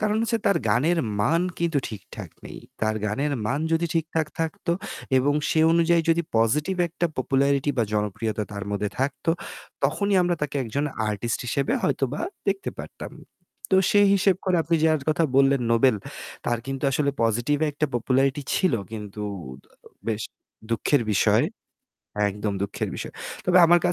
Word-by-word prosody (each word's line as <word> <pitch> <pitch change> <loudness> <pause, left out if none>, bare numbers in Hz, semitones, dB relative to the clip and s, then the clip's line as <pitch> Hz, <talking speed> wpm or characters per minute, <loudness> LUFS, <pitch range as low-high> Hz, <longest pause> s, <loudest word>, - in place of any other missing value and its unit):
কারণ 215 0 +1
হচ্ছে 230 0 0
তার 200 - +4
গানের 150 +11 +3 0.2
মান 165 +11 +2 0.2
কিন্তু 165 -4 +1
ঠিকঠাক 110 - -9 0.2
নেই। - - -9 0.2
তার 110 0 +1
গানের 140 +8 -1
মান 140 +5 0
যদি 165 +1 +2
ঠিকঠাক 160 -1 0
থাকতো 165 +1 -1 0.5
এবং 140 +3 +2 0.2
সে 160 - +3
অনুযায়ী 170 0 +3
যদি 170 +1 +2
পজিটিভ 145 +11 +2
একটা 175 +1 -1
পপুলারিটি 140 +2 +2
বা 115 - +4
জনপ্রিয়তা 105 +1 -1
তার 100 -1 -5
মধ্যে 105 0 -1
থাকতো 135 +3 0 0.5
তখনই 200 -1 +1
আমরা 175 0 +1
তাকে 145 -1 -2
একজন 130 +6 -2 0.3
artist 110 +3 -2
হিসেবে 135 +3 0
হয়তোবা 135 +2 0 0.3
দেখতে 195 0 -1
পারতাম। - - -9 0.6
তো 190 - +5
সেই 205 -1 +5
হিসেব 195 -2 +3
করে 185 -2 +2
আপনি 165 +1 +1
যার 155 -2 +3
কথা 165 +1 +2
বললেন 135 -1 +4
নোবেল 115 0 +4 0.5
তার 120 -1 +1
কিন্তু 135 0 -4
আসলে 140 +1 +1
পজিটিভ 120 +6 +1
একটা 150 +1 -1
popularity 135 +4 +1
ছিল 185 -9 +2 0.2
কিন্তু 105 -1 -6 0.9
বেশ 110 -1 -1 0.5
দুঃখের 120 +4 +2
বিষয়। 95 - +3 0.8
একদম 105 +1 -3
দুঃখের 100 - -3
বিষয়। - - -6 0.3
তবে 180 0 +5
আমার 175 +1 +6
140 Hz, 150 wpm, -25 LUFS, 115-165 Hz, 0.9 s, আমার